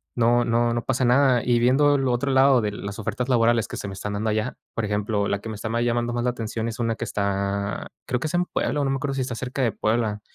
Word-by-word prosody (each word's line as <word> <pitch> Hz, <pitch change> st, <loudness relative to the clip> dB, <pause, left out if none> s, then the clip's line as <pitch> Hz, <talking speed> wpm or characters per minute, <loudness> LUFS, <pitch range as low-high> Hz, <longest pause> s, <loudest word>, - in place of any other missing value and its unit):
no 120 Hz, 0 st, +3 dB
no 120 Hz, 0 st, +1 dB
no 120 Hz, 0 st, -2 dB
pasa 130 Hz, -1 st, 0 dB
nada, 125 Hz, -1 st, +4 dB
y 120 Hz, -1 st, +3 dB
viendo 135 Hz, +4 st, +4 dB
el 135 Hz, -1 st, +1 dB
otro 125 Hz, +3 st, 0 dB
lado 135 Hz, -2 st, +5 dB
de 105 Hz, -, -1 dB
las 100 Hz, 0 st, -6 dB
ofertas 125 Hz, +3 st, -3 dB
laborales 120 Hz, -2 st, +3 dB
que -, -, -7 dB
se 100 Hz, -, -5 dB
me 95 Hz, -, -6 dB
están 100 Hz, +2 st, -5 dB
dando 110 Hz, +2 st, -1 dB
allá, 110 Hz, +3 st, -2 dB, 0.2 s
por 115 Hz, -, -2 dB
ejemplo, 105 Hz, 0 st, -1 dB
la 100 Hz, -, -1 dB
que 110 Hz, -, -8 dB
me 110 Hz, -, -5 dB
está 110 Hz, -, -5 dB
más 115 Hz, +1 st, 0 dB
llamando 120 Hz, 0 st, 0 dB
más 120 Hz, 0 st, -1 dB
la 125 Hz, -, +1 dB
atención 115 Hz, -1 st, -4 dB
es 115 Hz, +2 st, -5 dB
una 115 Hz, -1 st, 0 dB
que 120 Hz, -, -4 dB
está, 100 Hz, -1 st, -2 dB, 0.2 s
creo 125 Hz, -, 0 dB
que -, -, -4 dB
es 155 Hz, -, -6 dB
en 175 Hz, 0 st, +2 dB
Puebla, 150 Hz, -4 st, -1 dB
o -, -, 0 dB
no -, -, 0 dB
me 135 Hz, -, +1 dB
acuerdo 140 Hz, 0 st, -2 dB
si 135 Hz, -, -2 dB
está 125 Hz, -2 st, -3 dB
cerca 130 Hz, +3 st, -4 dB
de 115 Hz, -, +2 dB
Puebla, 110 Hz, 0 st, -1 dB
120 Hz, 285 wpm, -24 LUFS, 105-125 Hz, 0.2 s, lado